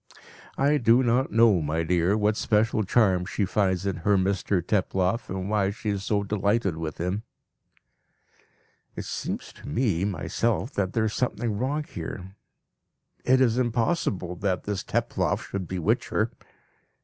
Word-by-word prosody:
"I 145 +2 +3
do 120 0 +4
not 125 +2 +2
know, 110 -4 +5
my 80 +2 -1
dear, 90 +4 +2
what 105 0 +2
special 110 +1 +1
charm 95 -3 +3
she 100 +2 -1
finds 95 -1 0
in 95 -3 -1
her 100 +4 +2
Mr 95 0 +1
Teploff, 95 +3 0
and 95 0 -3
why 100 -2 +1
she 110 +2 -4
is 100 -1 -3
so 100 0 0
delighted 100 -2 0
with 80 -1 -5
him." 90 +5 -2 1.7
(It - - -5
seems - - -5
to - - -13
me 100 - 0
myself 110 - -1
that 95 -2 -1
there 110 -1 +1
is 110 - -1
something 120 -3 -1
wrong 135 +7 -1
here. 95 - -7 0.9
It 130 +1 +4
is 120 -1 +3
impossible 115 - 0
that 95 -1 -1
this 100 -2 -3
Teploff - - -1
should 95 -3 -4
bewitch 90 -3 0
her. - - 0
100 Hz, 150 wpm, -26 LUFS, 95-115 Hz, 1.7 s, know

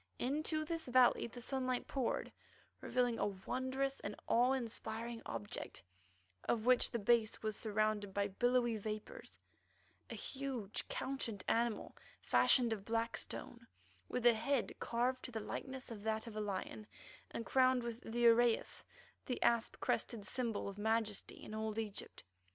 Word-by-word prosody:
Into 310 +4 0
this 330 -2 -3
valley 250 -1 +5
the 240 +1 -9
sunlight 255 -1 -1
poured, 265 -4 -1 0.5
revealing 245 -2 +1
a - - +2
wondrous 260 +7 -2
and 205 - -5
awe 245 +3 +4
inspiring 230 -2 -4
object 110 -3 -5 0.6
of 225 -1 +1
which 255 0 +5
the - - -1
base 225 0 +2
was 215 -1 -1
surrounded 215 -1 0
by 200 +1 +1
billowy 240 +2 +2
vapours, 215 - -6 0.7
a - - -5
huge, 260 -7 -3
couchant 235 -7 -3
animal 230 -1 +1 0.2
fashioned 240 -3 +4
of 205 -3 -5
black 230 +2 0
stone, - - -5 0.4
with 250 -1 -2
a 240 - +9
head 245 +3 0
carved 250 +2 0
to 250 - -6
the 225 - -3
likeness 260 +4 -5
of 215 -3 -6
that 220 0 -1
of 230 -2 -8
a 215 - -1
lion, 205 +1 -4 0.4
and 230 - -4
crowned 255 -1 +4
with 235 0 -4
the 235 0 -3
uraeus, 235 0 +4 0.4
the 250 - -1
asp 235 -1 +2
crested 220 -4 -1
symbol 235 -6 -1
of 200 +1 -6
majesty 220 -1 0
in - - -8
old 220 0 -2
Egypt. 215 -3 -5
235 Hz, 150 wpm, -37 LUFS, 215-255 Hz, 0.7 s, a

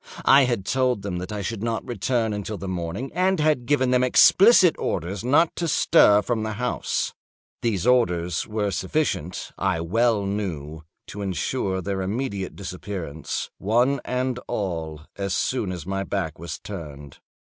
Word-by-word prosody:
I 135 0 +7
had 120 -6 -1
told 125 -3 +1
them 95 -3 -3
that 90 +2 -5
I 105 -1 -4
should 110 0 -4
not 115 0 -2
return 115 0 0
until 105 +1 -4
the 95 - -6
morning, 90 +8 -4
and 185 0 +1
had 150 -6 +1
given 130 -3 +2
them 125 0 +3
explicit 185 - +6
orders 95 +6 -3
not 145 +7 +3
to 170 - -1
stir 125 -9 +5
from 115 -1 -1
the 110 0 -3
house. 125 +3 -2 0.5
These 110 -6 -1
orders 90 -9 +2
were 105 -2 -1
sufficient, 95 - -2
I 95 -3 +1
well 105 +5 +1
knew, 80 -7 -4 0.2
to 105 - -8
insure 95 0 -2
their 95 0 -2
immediate 100 -1 -3
disappearance, 90 -5 -5
one 120 +7 +2
and 125 0 -2
all, 80 -6 -3 0.2
as 100 -1 -2
soon 115 -7 -1
as 85 -4 -6
my 95 +1 -2
back 90 -6 -3
was 85 -1 -6
turned. 75 -8 -9
100 Hz, 155 wpm, -24 LUFS, 90-125 Hz, 0.5 s, I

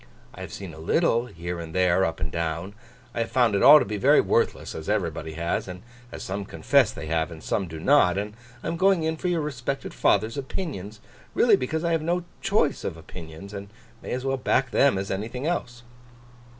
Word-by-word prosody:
I - - -10
have - - -7
seen 95 -5 -7
a 80 - -11
little, 120 - +2
here 85 -4 -6
and 80 0 -8
there, 90 0 +3
up 80 - -3
and 75 0 -3
down; 85 +4 -3 0.4
I - - -4
have 115 - -1
found 120 -4 +3
it 100 - +1
all 150 +2 +10
to - - +2
be 105 +1 -3
very 100 - +5
worthless, - - +1
as 80 - -6
everybody 85 -6 -1
has, 85 +4 -2
and 90 +1 -8 0.3
as - - -7
some 100 +2 -3
confess - - +2
they 75 - -7
have, 80 +1 0
and 80 -2 -11
some 95 -3 -1
do 80 -1 -7
not; 95 - +4
and 105 +1 -3 0.3
I - - -4
am 165 +1 -2
going 190 -2 +3
in 160 0 0
for 170 - -4
your 175 -2 +1
respected 135 -2 -4
father's 110 +6 +2
opinions—really 110 - -1
because 155 +5 -2
I 170 - +1
have 165 -1 +1
no 175 +3 0 0.2
choice 195 -8 +1
of 85 - -4
opinions, 80 +3 -10
and 100 0 -7 0.3
may - - -8
as 130 +1 -3
well 135 0 0
back 130 0 +1
them 140 -5 +4
as 95 +1 -3
anything 115 +7 -4
else. 120 -8 -3
105 Hz, 215 wpm, -25 LUFS, 85-140 Hz, 0.4 s, all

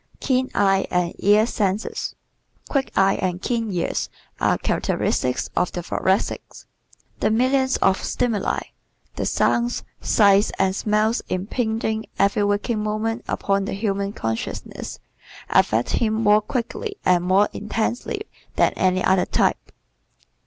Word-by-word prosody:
Keen 260 -1 +1
Eye 195 -1 +3
and 180 -1 0
Ear 210 +2 +5
Senses 205 -2 -2 0.5
¶ - - -17
Quick 275 -2 0
eyes 195 0 +3
and 180 -1 -1
keen 230 +1 -1
ears 175 -2 -1 0.3
are - - +2
characteristic 125 -1 0 0.2
of 180 - +1
the 175 - -3
Thoracics. 190 +4 -1 0.5
The - - +2
millions 260 +3 +2
of 190 0 +2
stimuli 230 -5 0 0.5
the - - -2
sounds, 240 +1 +1 0.2
sights 200 -1 +4
and 190 0 +1
smells 215 +2 +1
impinging 220 +3 -2
every 200 +1 +2
waking 205 +2 0
moment 215 +2 -2
upon 195 0 0
the - - -3
human 200 -1 -1
consciousness 115 - -5 0.5
affect 115 +2 +3
him 220 -2 +1
more 215 -1 +4
quickly 255 - -4
and 180 -1 +4
more 190 +3 +4
intensely 220 +3 -2 0.3
than - - +3
any 185 0 +1
other 190 -1 +3
type. - - 0
210 Hz, 130 wpm, -22 LUFS, 190-225 Hz, 0.5 s, Ear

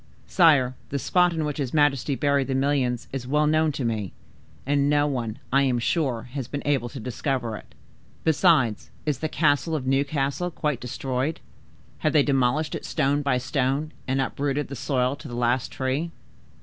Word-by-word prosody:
"Sire, 150 -8 +4 0.2
the 140 - -2
spot 180 +5 +3
in 160 -2 -2
which 150 0 -3
his 135 0 -2
majesty 145 -2 +2
buried 140 -1 +1
the 135 - -1
million 135 -2 +1 0.2
is 130 -2 -4
well 150 +3 +2
known 155 +1 +3
to 135 -3 -3
me, 110 -5 -2 0.5
and 140 +1 +2
no 145 0 +3
one, 120 -6 -2 0.2
I 135 - +5
am 130 -3 +2
sure, 120 -2 0
has 135 -3 -4
been 145 - -5
able 135 -4 +1
to 135 - -8
discover 125 -1 -2
it. - - -12 0.5
Besides, 155 - +3 0.2
is 150 -4 -1
the 155 - -2
castle 155 +1 +2
of 135 -4 -3
Newcastle 140 +4 0
quite 150 -6 -2
destroyed? 130 +4 -2 0.6
Have 155 - +1
they 150 -2 +5
demolished 140 +2 +1
it - - -4
stone 140 +2 +1
by 140 -3 +1
stone, 135 +3 -1 0.2
and 135 +1 0
uprooted 140 +2 -1
the 140 - -5
soil 130 0 0
to - - -10
the 120 - -6
last 120 +1 0
tree?" 135 +6 -1
140 Hz, 180 wpm, -25 LUFS, 130-150 Hz, 0.6 s, I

